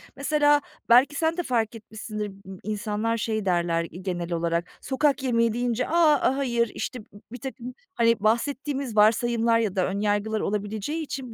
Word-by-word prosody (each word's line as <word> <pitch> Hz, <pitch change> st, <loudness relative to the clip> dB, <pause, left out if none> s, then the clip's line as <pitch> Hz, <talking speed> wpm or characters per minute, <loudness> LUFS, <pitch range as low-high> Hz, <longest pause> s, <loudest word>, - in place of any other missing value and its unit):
mesela 290 Hz, +1 st, +3 dB, 0.3 s
belki 260 Hz, +5 st, +6 dB
sen 325 Hz, +2 st, 0 dB
de 355 Hz, -, -1 dB
fark 230 Hz, -4 st, -1 dB
etmişsindir, 215 Hz, -1 st, -6 dB, 0.2 s
ımm, 190 Hz, -1 st, -9 dB
insanlar 215 Hz, +2 st, -2 dB
şey 220 Hz, -2 st, -2 dB
derler, 170 Hz, -2 st, +1 dB
iii, 180 Hz, +2 st, -10 dB
genel 175 Hz, -2 st, -3 dB
olarak, 170 Hz, +1 st, -1 dB
sokak 275 Hz, +1 st, +1 dB
yemeği 230 Hz, -3 st, +2 dB
deyince: 245 Hz, 0 st, -1 dB
"A, 300 Hz, -5 st, +3 dB
hayır." 235 Hz, -4 st, +1 dB
İşte 250 Hz, -, -4 dB
b -, -, -18 dB, 0.3 s
birtakım, 250 Hz, 0 st, -7 dB, 0.2 s
hani, 230 Hz, -2 st, +3 dB
bahsettiğimiz 265 Hz, +3 st, -1 dB
varsayımlar 230 Hz, +2 st, +3 dB
ya 210 Hz, -4 st, -1 dB
da 185 Hz, -, +2 dB
ön 195 Hz, +1 st, -3 dB
yargılar 210 Hz, +1 st, 0 dB
olabileceği 210 Hz, +10 st, -2 dB
için 265 Hz, -5 st, -6 dB
230 Hz, 160 wpm, -25 LUFS, 210-265 Hz, 0.3 s, belki